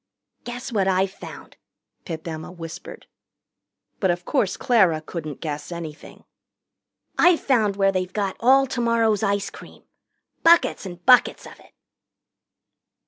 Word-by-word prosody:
"Guess 245 +1 -6
what 200 -4 +1
I've 190 0 +1
found!" - - -12 0.5
Pip 160 -2 -6
Emma 160 +1 -6
whispered. 170 0 -9 0.9
But 190 - +1
of 175 0 -1
course 220 -9 0
Clara 195 - +3
couldn't 155 -2 -7
guess 150 0 -5
anything. 165 -3 -9 1.0
"I've 350 -1 +5
found 220 -7 +1
where 195 -1 +2
they've 185 -1 -2
got 200 -1 -2
all 265 +3 +5
tomorrow's 230 -4 +1
ice 200 -1 -1
cream. - - -14 0.6
Buckets 335 - +4
and 175 -1 -11
buckets 250 -2 +4
of - - -13
it." - - -21
195 Hz, 130 wpm, -23 LUFS, 170-235 Hz, 1.0 s, I've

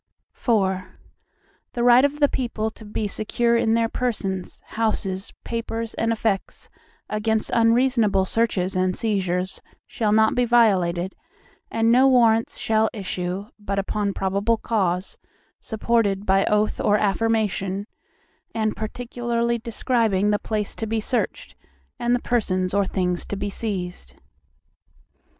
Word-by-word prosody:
IV 190 -6 +1 0.9
The 240 - -1
right 245 +1 +7
of 285 +1 +1
the 290 - +5
people 230 -5 -2
to 220 - -15
be 210 0 -2
secure 235 +3 0
in 225 -1 +2
their 230 0 +2
persons, 205 -7 -3
houses, 200 -4 -2
papers, 230 -1 -4
and 225 0 0
effects, 215 -3 -2 0.4
against 215 +1 -1
unreasonable 230 -4 +3
searches 190 -3 0
and 185 0 +1
seizures, 185 -4 -1 0.2
shall 215 -3 -1
not 220 +1 +4
be 245 - +2
violated, 190 -7 +3 0.6
and 225 0 +2
no 255 +3 +6
Warrants 230 -3 +3
shall 220 0 +2
issue, 185 -2 -4
but 200 -1 -3
upon 200 0 -1
probable 200 +4 +1
cause, 190 -5 -1 0.4
supported 220 -3 0
by 195 0 +3
oath 210 0 +1
or 205 - +3
affirmation, 205 -2 0 0.7
and 220 -1 0
particularly 235 +1 -2
describing 225 -3 +1
the 205 - +1
place 210 -2 -3
to 225 - -3
be 225 +1 0
searched, 220 -1 -2 0.5
and 240 +1 +2
the - - 0
persons 185 -6 0
or 200 -1 +2
things 180 -2 -1
to - - -3
be 200 0 -3
seized. 180 - -5
215 Hz, 130 wpm, -23 LUFS, 195-230 Hz, 0.9 s, right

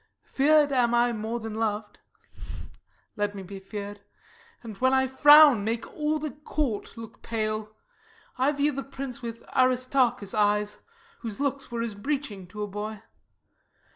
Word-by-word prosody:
Fear'd 295 +1 +3
am 240 -3 +2
I 240 0 +3
more 220 +2 -3
than 225 -1 -6
lov'd; 215 -1 -3 1.2
let 205 0 -1
me 195 - -6
be 195 +1 -8
fear'd, 205 +1 -7 0.6
And, 220 -3 -8
when 260 +3 +3
I 265 0 +3
frown, 290 -2 +7
make 225 +2 -2
all 305 0 0
the 305 -1 -4
court 290 -7 -3
look 225 -1 -10
pale. 215 -1 -3 0.6
I 260 +3 +2
view 290 0 +1
the 275 -1 -4
prince 275 -1 -7
with 230 -1 -7
Aristarchus' 255 -4 +2
eyes, 210 -1 +1 0.4
Whose 225 -4 -6
looks 280 -1 -2
were 235 -1 -2
as 230 -2 -3
a - - -15
breeching 265 -8 -3
to 210 +3 -6
a - - -3
boy. 210 +1 -6
230 Hz, 155 wpm, -27 LUFS, 210-270 Hz, 1.2 s, frown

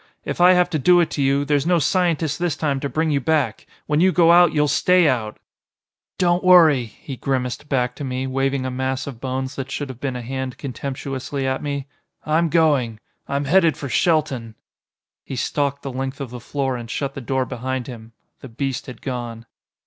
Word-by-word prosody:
If - - -3
I 180 +1 +8
have 180 -1 +3
to 155 - 0
do 175 +5 +5
it 170 - +1
to 145 - -2
you, 140 +1 +2
there's 145 +1 +1
no 175 -1 +4
scientist 165 -2 +1
this 175 -4 0
time 145 -3 0
to 140 - -3
bring 160 +1 0
you 140 -1 +1
back. 155 -1 0 0.2
When 150 +1 +1
you 185 +1 +5
go 170 -2 +5
out 175 -1 +6
you'll 150 -1 +2
stay 175 +4 +4
out!" 115 -6 -1 0.8
"Don't 175 -1 +2
worry," 165 -8 +6
he 130 +5 -9
grimaced 130 +1 -3
back 125 -3 0
to - - -5
me, 130 0 -3
waving 135 0 -1
a 130 - -2
mass 130 +1 -2
of 130 -5 -8
bones 130 0 -3
that 135 -1 -4
should 140 0 -4
have 130 -2 -8
been 135 -2 -3
a 125 - -5
hand 130 +1 -4
contemptuously 135 +1 -4
at 130 0 -1
me, 140 -2 -3 0.4
"I'm 160 +2 +2
going. 145 -9 +2 0.3
I'm 140 +1 -1
headed 165 +1 +3
for 140 - -5
Shelton." 135 -7 0 0.7
He 135 - -6
stalked 140 +2 -1
the 135 - -5
length 135 +1 -4
of 135 -4 -6
the 125 - -7
floor 135 +2 -2
and 120 -1 -8
shut 140 +3 -3
the 135 - -7
door 130 +1 -1
behind 130 +1 -4
him. 115 -3 -10 0.3
The 135 - -10
beast 130 +2 -3
had 125 - -10
gone. 120 -3 -5
135 Hz, 205 wpm, -21 LUFS, 130-155 Hz, 0.8 s, I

